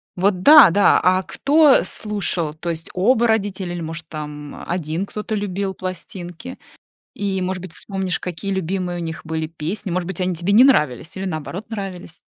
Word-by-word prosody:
Вот 185 0 +1
да-да, 210 - +8
а 185 +1 +3
кто 290 - +4
слушал, 195 -7 -2
то 160 +2 -6
есть 165 -1 -4
оба 230 +6 +3
родителя 200 -5 -1
или, 175 - -5
может, 160 0 -6
там 150 -1 -7
1 175 +2 -2
кто-то 210 +1 -5
любил 200 -2 -2
пластинки, 185 +5 -7 0.5
и, 195 -2 -2
может 185 0 -2
быть, 185 -2 -9
вспомнишь, 190 0 -2
какие 180 +2 -4
любимые 180 -1 -2
у - - -4
них 165 0 -6
были 160 0 -3
песни, 170 +5 -5
может 175 0 -1
быть, 190 -1 -4
они 180 0 0
тебе 175 +4 -1
не 230 +5 +8
нравились 150 - +2
или, 190 - -4
наоборот, 175 +3 -5
нравились? 190 -5 -7
185 Hz, 170 wpm, -21 LUFS, 165-200 Hz, 0.5 s, да-да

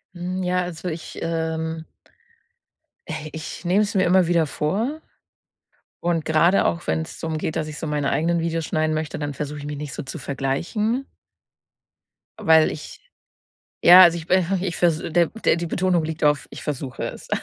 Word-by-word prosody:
Hm, 180 +2 -3
ja, 180 0 +1
also 175 0 -6
ich, 165 -1 -6
ähm 160 -1 -3 1.2
äh, 155 0 -5
ich 160 +2 -7
nehme 190 +4 +3
es 205 - -4
mir 185 - +4
immer 180 -1 +4
wieder 170 -2 +3
vor. 225 - -2 1.0
Und 170 -2 0
gerade 170 +4 +3
auch 170 - -1
wenn's 160 +1 -2
darum 160 -1 -3
geht, 155 - -3
dass 155 -1 -1
ich 150 - -8
so 160 - -4
meine 145 -2 0
eigenen 165 +4 +1
Videos 165 -1 -1
schneiden 155 0 0
möchte, 155 0 -3
dann 145 -1 -3
versuche 150 +1 -5
ich 145 - -8
mich 145 -1 -5
nicht 150 -1 -6
so 150 - -5
zu 135 +5 -7
vergleichen. 170 - -1 1.3
Weil 160 -1 +5
ich 155 - -9 0.8
ja, 180 +2 +10
also, 170 -1 +6
ich 165 - -9
bin 185 0 +3
ve 195 -1 0
ich 175 - -3
vers 170 -3 +2
der 170 +1 +1
der 225 - +1
die 170 0 -3
Betonung 180 0 +1
liegt 160 -1 -3
auf: 150 -1 +2
Ich - - -9
versuche 135 -3 -4
es. - - -7
165 Hz, 180 wpm, -23 LUFS, 155-175 Hz, 1.3 s, ja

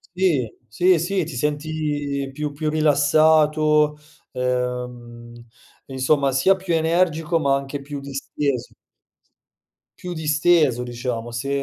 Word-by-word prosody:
Sì. 155 - 0
Sì, 180 +7 +3
sì, 180 +2 -1
ti 150 -4 -7
senti 145 -1 -2
più 150 +1 -4
più 155 +2 -3
rilassato, 150 0 +3 0.4
ehm, 125 -2 -4 0.5
insomma, 135 +1 +1
sia 135 +9 +3
più 185 -3 -2
energico, 165 0 +1
ma 140 -3 +2
anche 140 +1 -4
più 145 0 -7
disteso. 140 -1 -4 1.3
Più 180 0 -5
disteso, 150 -4 +2
diciamo. 120 -1 -4
Se, 120 +4 -4
145 Hz, 110 wpm, -22 LUFS, 130-155 Hz, 1.3 s, Sì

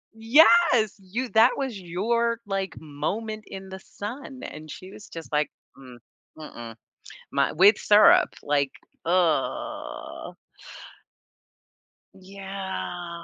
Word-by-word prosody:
Yes! 245 - +5
"You 225 +7 -4
that 225 +3 +4
was 265 -7 -3
your, 230 +7 0
like, 195 -2 -3
moment 205 +9 -4
in 190 0 -9
the 190 0 -8
sun," 250 +7 -8
and 155 0 -9
she 185 +5 -10
was 205 - -12
just, 165 -2 -9
like, 150 0 +1 0.3
"Mm, 130 -2 -13 0.4
mm-mm." 120 -7 -9 0.6
My 140 0 +2
with 195 +5 +6
syrup, 210 0 +6
like, 140 -2 0 0.3
ugh. 165 -5 -1 1.8
Yeah. 190 -3 -6
190 Hz, 105 wpm, -25 LUFS, 160-225 Hz, 1.8 s, with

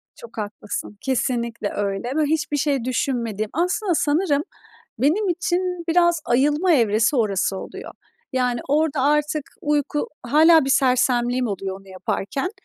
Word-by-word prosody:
Çok 235 -1 -13
haklısın. 210 0 -5
Kesinlikle 235 -4 -1
öyle 200 +2 -2
ve 310 - +2
hiçbir 300 -1 0
şey 280 -3 0
düşünmediğim. 230 -4 -2
Aslında 360 - 0
sanırım 295 0 +1 0.6
benim 325 - +2
için 355 0 -1
biraz 345 0 +3
ayılma 295 +8 +2
evresi 225 0 +3
orası 200 -4 +1
oluyor. - - -8 0.4
Yani, 250 -2 0
orada 300 -1 +1
artık 300 +1 +1 0.2
uyku, 295 0 -1
hâlâ 315 +5 +5
bir 270 - -1
sersemliğim 250 -1 +2
oluyor 195 -2 -4
onu 195 - -19
yaparken. 195 - -3
270 Hz, 130 wpm, -22 LUFS, 230-310 Hz, 0.6 s, hâlâ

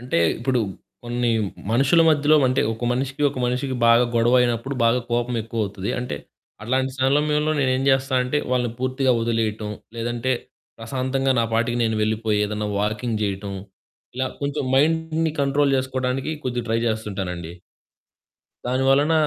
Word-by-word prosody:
అంటే 125 -7 -1 0.2
ఇప్పుడు 125 +1 0 0.4
కొన్ని 120 0 0 0.4
మనుషుల 135 +8 +4
మధ్యలో 155 0 +4
అంటే 130 - +1
ఒక 110 +2 -5
మనిషికి 135 +3 -2
ఒక 130 - -7
మనిషికి 130 +1 -1
బాగా 115 +1 +6
గొడవైనప్పుడు 120 +2 +2
బాగా 115 +2 +3
కోపం 120 +1 0
ఎక్కువవుతది. 105 -3 -3
అంటే 125 -11 -4 0.5
అట్లాంటి 130 +3 0
సమయంలో 150 +3 +2
నేను 135 -2 +2
ఏం 130 - -1
జేస్తానంటే 130 0 +2
వాళ్ళని 125 -2 +1
పూర్తిగా 130 +1 +1
వదిలేయటం, 110 -2 -1 0.3
లేదంటే 120 +2 -1 0.5
ప్రశాంతంగా 130 +3 -1
నా - - +2
పాటికి 120 +1 +1
నేను 110 -1 0
వెళ్ళిపోయి 110 0 0
ఏదైనా 105 0 -3
వాకింగ్ 105 +2 -1
జేయటం 100 -1 -3 0.6
ఇలా 130 0 0
కొంచెం 140 0 -2
మైండ్‌ని 160 +2 +2
కంట్రోల్ 140 +1 +2
జేసుకోవడానికి 130 +1 -2
కొద్దిగా 125 -2 -2
ట్రై 115 +1 +1
జేస్తుంటానండి. 95 -6 -3 1.1
దాని 130 +2 0
వలన 145 +4 +4
125 Hz, 135 wpm, -23 LUFS, 115-135 Hz, 1.1 s, బాగా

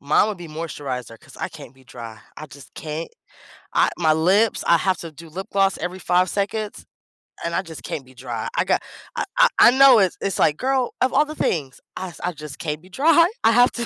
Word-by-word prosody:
Mine 150 +8 +3
would 210 -3 -4
be 175 - -8
moisturizer 140 -7 -6
'cause - - -16
I - - -3
can't 130 - -12
be 130 0 -22
dry. 115 -2 -10 0.2
I 155 - -8
just 140 -1 -14
can't 155 +1 -5 0.6
I - - +4
my 160 -3 +3
lips 190 +8 +2
I 170 - +6
have 185 +1 0
to 165 -2 -8
do 165 +2 -12
lip 190 +5 -6
gloss 195 -1 +2
every 180 +2 -4
5 180 +1 +2
seconds 205 +2 -3 0.6
and 170 - -2
I - - +1
just 165 -4 -10
can't 140 - -5
be 130 - -18
dry. 120 -3 -5
I - - +2
got - - +1 0.3
I - - -1
I - - +7
I 240 - +9
know 265 -2 +7
it's 190 -3 +1
it's 195 -2 -2
like, 150 - +3
"Girl, 260 -1 0
of 255 - +2
all 295 +3 +4
the 305 +1 -8
things." 140 -7 -2 0.2
I 190 - -5
s 175 - -14
I 180 - 0
just 150 -3 -9
can't 150 -2 -3
be 185 - -18
dry. 320 - +4 0.2
I 225 - +6
have 245 +2 +5
to 235 -1 -3
175 Hz, 235 wpm, -22 LUFS, 150-215 Hz, 0.6 s, I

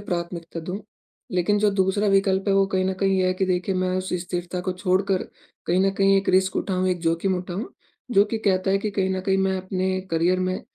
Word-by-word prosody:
प्राथमिकता 170 -3 -4
दूँ। 180 +5 -5 0.5
लेकिन 185 +3 +2
जो 210 0 +3
दूसरा 195 +1 +1
विकल्प 195 0 +2
है 195 - +3
वो 195 0 +4
कहीं 190 -1 0
न 190 - 0
कहीं 195 -1 +2
ये 185 - +2
है 185 - +1
कि 190 - 0
देखिए 185 +1 0
मैं 185 0 0
उस 185 0 -3
स्थिरता 175 0 -4
को 185 +1 -2
छोड़कर 185 +1 0 0.4
कहीं 180 +2 +2
न - - +3
कहीं 195 0 +5
एक 195 - 0
रिस्क 190 0 +3
उठाऊँ, 185 -1 0
एक 180 -1 -1
जोखिम 170 +3 0
उठाऊँ। 180 +5 -5 0.4
जो 200 -4 +5
कि 220 +2 -3
कहता 190 -1 +2
है 195 - +3
कि 210 +1 -3
कहीं 195 -2 0
न 190 0 -1
कहीं 190 0 +1
मैं 190 0 +1
अपने 185 0 -2
करियर 170 +3 +2
में 185 0 -1
185 Hz, 230 wpm, -24 LUFS, 185-195 Hz, 0.5 s, कहीं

